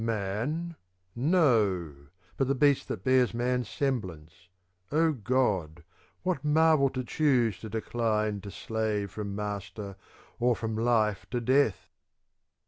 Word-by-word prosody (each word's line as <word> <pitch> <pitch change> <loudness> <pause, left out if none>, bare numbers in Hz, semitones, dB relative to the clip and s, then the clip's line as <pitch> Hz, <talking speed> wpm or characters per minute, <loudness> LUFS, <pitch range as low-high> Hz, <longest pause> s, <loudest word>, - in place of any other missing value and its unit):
Man? 115 - -2 0.4
no! 115 - +2 0.4
but 135 - 0
the 135 - +1
beast 140 0 +3
that 95 - -5
bears 130 -1 +3
man's 125 -1 0
semblance; 90 - -4 0.4
Oh 160 +2 +3
God, 100 - 0 0.4
what 175 -7 -1
marvel 155 -2 +4
to 130 0 -4
choose 125 - +1
to 110 - -8
decline 110 -2 -1
to 100 - -8
slave 105 -2 -2
from 100 -1 -5
master, 100 -1 -5 0.4
or 120 0 +3
from 110 -1 -3
life 110 -3 +1
to 125 - -1
death 130 -3 +2
115 Hz, 125 wpm, -29 LUFS, 100-135 Hz, 0.4 s, marvel